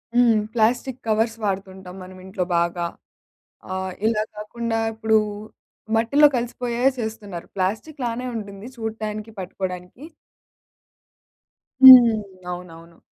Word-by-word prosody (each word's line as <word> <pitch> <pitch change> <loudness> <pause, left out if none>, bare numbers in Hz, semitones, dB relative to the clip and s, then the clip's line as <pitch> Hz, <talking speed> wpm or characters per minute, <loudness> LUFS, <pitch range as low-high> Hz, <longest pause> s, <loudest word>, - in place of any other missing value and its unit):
హ్మ్. 240 -2 +5 0.2
Plastic 245 +3 0
covers 225 +1 +1
వాడుతుంటాం 190 -2 -4
మనం 185 0 -12
ఇంట్లో 190 0 -3
బాగా. 170 0 0 0.9
ఆహ్, 190 0 -3
ఇలా 220 -1 +1
కాకుండా 225 +2 -3
ఇప్పుడు 220 0 +1 0.8
మట్టిలో 280 +7 +5
కలిసిపోయేయే 245 +1 0
సేస్తున్నారు. 220 -6 -6
ప్లాస్టిక్‌లానే 235 +5 -3
ఉంటుంది 200 -1 -8
చూడటానికి, 220 -1 -5
పట్టుకోవడానికి. 185 +4 -6 1.8
హ్మ్. 245 -4 +11 0.4
అవునవును. 170 -1 -10
220 Hz, 90 wpm, -22 LUFS, 190-235 Hz, 1.8 s, హ్మ్